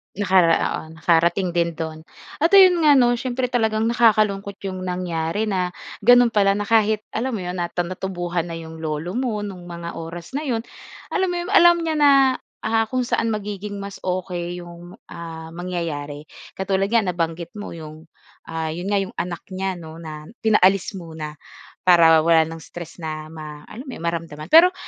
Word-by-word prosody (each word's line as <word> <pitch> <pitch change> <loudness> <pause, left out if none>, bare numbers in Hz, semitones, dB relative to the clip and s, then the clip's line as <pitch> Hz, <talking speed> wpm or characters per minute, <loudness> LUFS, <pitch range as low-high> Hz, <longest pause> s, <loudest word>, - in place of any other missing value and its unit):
Nakara 185 -4 +4 0.3
oo, - - -8
nakarating 170 +3 +2
din 170 -1 0
do'n. 160 -1 -5 0.4
At 325 - +4
ayon 370 -3 +8
nga 300 -2 +6
'no? 245 -2 +5
Siyempre 250 -1 -2
talagang 220 -3 +1
nakakalungkot 215 -4 +2
'yong 190 -1 -4
nangyari 180 0 -2
na, 185 -4 -1 0.2
gano'n 245 +2 +6
pala 200 -2 +3
na 205 - -1
kahit, 215 0 +2
alam 240 +2 -2
mo 195 - -4
'yon? 180 0 -4
Nata 175 0 -1
natubuhan 175 -1 -3
na 165 - -5
'yong 160 -1 -9
lolo 155 +2 -3
mo, 225 -2 -2
nung 185 -4 -7
mga 170 -1 -6
oras 165 +1 -8
na 290 +3 -3
'yon, 230 -3 -1 0.5
alam 380 -1 +1
mo 355 - -2
'yon, 365 - -6
alam 345 -4 +7
niya 320 -1 -1
na 290 -1 +6 0.5
ah, 225 0 +2
kung 255 +1 0
saan 230 - 0
magiging 205 -1 -4
mas 200 0 -7
okey 180 -1 -3
'yong, 175 +1 -12 0.2
ah, 165 -1 -8
mangyayari. 165 -5 -4 0.3
Katulad 190 0 0
nga 230 +1 +3
nabanggit 170 -2 -2
mo 205 - -7
'yong, 155 0 -10 0.4
ah, 160 -1 -3
'yon 175 +3 -5
nga, 205 - +2
'yong 190 - -9
anak 175 -1 -4
niya 190 0 -2
'no, 160 -1 -10
na 155 -2 -8 0.2
pinaalis 195 -1 +3
muna, 160 -3 -7 0.5
para 165 -2 +7
wala 165 -1 +5
ng 165 - -7
stress 170 0 -10
na 155 -1 -5
ma 155 -2 -9
alam 245 +6 -9
mo 260 - -6
'yon, - - -10
maramdaman. 165 -2 -4
Pero 350 +3 +7
180 Hz, 180 wpm, -22 LUFS, 165-215 Hz, 0.5 s, ayon